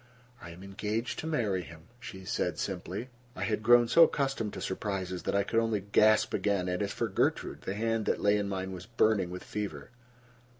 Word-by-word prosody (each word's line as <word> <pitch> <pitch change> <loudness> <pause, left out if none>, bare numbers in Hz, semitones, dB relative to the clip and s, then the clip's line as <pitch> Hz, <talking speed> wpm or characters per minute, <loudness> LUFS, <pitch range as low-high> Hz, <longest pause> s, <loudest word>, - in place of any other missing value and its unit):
"I - - -9
am 85 +3 -11
engaged 105 +4 -3
to 160 - -4
marry 110 - 0
him," 85 -2 -12 0.2
she 95 -6 -9
said - - -1
simply. 100 +8 -4 0.3
I - - -3
had 105 -1 -1
grown 120 +1 +6
so 165 +8 +7
accustomed 135 -9 -1
to - - -6
surprises 95 -2 -3
that - - -2
I 100 - +3
could 115 +3 +1
only 115 -2 +1
gasp 105 +2 +3
again, 100 -3 0
and 90 +2 -1
as 100 -1 -1
for - - -1
Gertrude, - - -1
the 95 - -2
hand 115 0 -1
that - - +1
lay 105 0 +3
in 100 -1 -2
mine 95 -1 -3
was 90 +1 -8
burning 110 -5 +2
with 90 +1 -7
fever. 105 +3 -5
105 Hz, 205 wpm, -30 LUFS, 95-115 Hz, 0.3 s, so